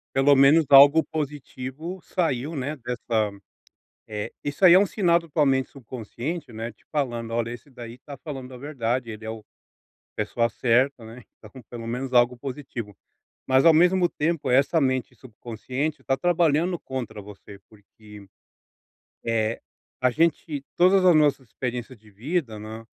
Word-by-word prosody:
Pelo 140 +1 +5
menos 140 +4 +6
algo 140 +3 +8
positivo 150 +3 -6
saiu, 155 -4 -1
né, 145 +1 -3
dessa, 115 -4 -2 0.8
eh, 105 +1 -5
isso 145 +6 -5
aí 180 -2 +9
é - - +8
um 200 - +4
sinal 175 -4 +2
totalmente 145 -5 +1
subconsciente, 130 - -7
né, 115 +2 -5
te 110 - -30
falando 120 -6 -2
olha 115 0 -1
esse 120 +3 -9
daí 120 -2 -9
está 140 +3 -11
falando 135 -4 -7
a - - -9
verdade 125 -3 -3
ele 110 0 -8
é - - -4
o 110 0 -6 0.6
a - - -8
pessoa 115 +2 0
certa, 125 +3 +1
né, 110 - -10
ele 125 - -14
está 110 - -15
com 130 - -13
pelo 115 +1 -9
menos 125 +2 -4
algo 120 0 +4
positivo. 125 -6 -7 0.5
Mas 130 0 +4
ao 165 - +9
mesmo 180 +2 +4
tempo 155 -3 -1
essa 135 +6 +3
mente 130 -2 -1
subconsciente 130 +5 -5
está 135 - 0
trabalhando 175 0 +2
contra 120 -5 -6
você 100 0 -13
porque, 105 -1 -16 1.0
eh, 115 -1 0 0.4
a 130 - +4
gente, 155 -1 0
todas 185 +2 +4
as 180 -2 +6
nossas 145 -4 +2
experiências 125 +1 -5
de 110 0 -21
vida, 120 - -3
né, 110 +1 -9
130 Hz, 160 wpm, -24 LUFS, 115-150 Hz, 1.0 s, aí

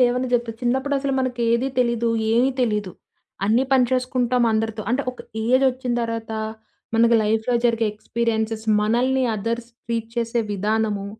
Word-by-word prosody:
లేవని 250 +1 +2
జెప్పొచ్చు. 235 -2 0
చిన్నప్పుడసలు 270 +2 0
మనకేది 245 0 0
తెలీదు, 235 -1 +1 0.2
ఏమీ 245 +4 +3
తెలీదు. 210 -5 0 0.5
అన్నీ 225 +6 +3
పని 255 -2 +5
చేసుకుంటాం 250 -1 +1
అందరితో. 220 0 -1
అంటే 270 +3 +1
ఒక 250 - -18 0.3
ఏజొచ్చిన 255 0 +2
తర్వాత, 230 -1 -4 0.7
మనకు 235 +1 +5
లైఫ్‌లో 220 +3 +1
జరిగే 230 -2 +2
ఎక్స్‌పీరియెన్స్‌స్, 220 0 -2
మనల్ని 250 +4 +2
అదర్స్ 230 +3 -3 0.2
ట్రీట్ 230 -1 -3
చేసే 230 0 0
విధానము, 210 0 -1
235 Hz, 130 wpm, -22 LUFS, 225-250 Hz, 0.7 s, పని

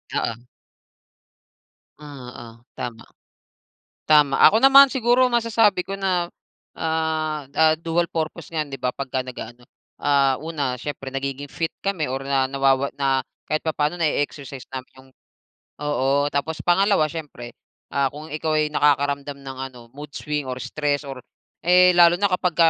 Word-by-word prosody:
Oo. 115 +1 -2 1.6
Oo, 125 -5 -11
tama. 120 -3 -6 1.0
Tama, 150 -3 +4
ako 220 - +7
naman 275 +1 +9
siguro 255 -1 +3
masasabi 225 -4 +3
ko 195 +2 -6
na, 180 -3 0 0.5
ah, 155 -2 -2
ah, 160 +1 +4
dual 165 +1 -1
purpose 160 0 -5
yan 155 -2 -2
'di 135 - -6
ba, 125 - -1
pagka 130 -1 -3
nag-aano, 120 -1 -9 0.3
ah, 140 -2 +2
una, 145 -5 -3
siyempre 135 +1 -6
nagiging 135 +1 -4
fit 165 +3 -3
kami 195 -6 -1
or 135 +1 -3
na 135 -1 +1
nawawa 135 0 +1
na, 135 -1 0 0.2
kahit 155 +2 -1
papaano 155 +2 -1
na-exercise 145 -4 -2
namin 130 -1 -7
yung, 130 0 -17 0.7
oo. 145 -1 +1
Tapos, 145 +3 -3
pangalawa, 175 -2 +3
syempre, 145 -7 -8 0.4
ah, 140 -1 +1
kung 155 +2 -9
ikaw 155 +1 -2
ay 150 0 +1
nakakaramdam 140 -1 +1
ng 135 -1 -8 0.2
ano, 125 - -13
mood 145 +1 -10
swing 150 -1 -3
or 125 - -4
stress 145 -2 -1
or, 135 -1 -7 0.5
eh, 180 +1 +6
lalo 170 -1 +7
na 200 -1 +2
kapag 180 -2 0
145 Hz, 145 wpm, -22 LUFS, 135-165 Hz, 1.6 s, naman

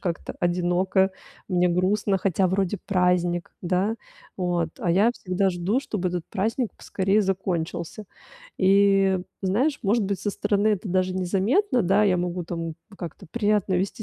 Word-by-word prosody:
как-то 175 -3 -4
одиноко, 180 +2 +2 0.4
мне 180 -2 +2
грустно, 195 +3 +1
хотя 190 0 +1
вроде 190 +1 0
праздник, 180 -2 +1
да. 190 +5 0 0.4
Вот. 175 -3 0
А 175 - 0
я 200 +7 +4
всегда 190 -2 0
жду, 185 +7 0
чтобы 210 -9 -2
этот 175 -2 -3
праздник 220 +4 -1
поскорее 195 +2 0
закончился. 185 -1 -2 0.5
И, 195 0 +4 0.2
знаешь, 250 +11 +1
может 215 +1 +2
быть, 195 -1 -2
со 205 - -1
стороны 205 +1 +1
это 210 -1 -1
даже 185 0 +1
незаметно, 205 - +1
да, 195 +3 +3
я 190 -3 +3
могу 180 0 -2
там, 165 -1 -4 0.2
как-то, 180 +1 -8
приятно 210 -4 +1
вести 195 +4 -1
190 Hz, 145 wpm, -25 LUFS, 180-205 Hz, 0.5 s, я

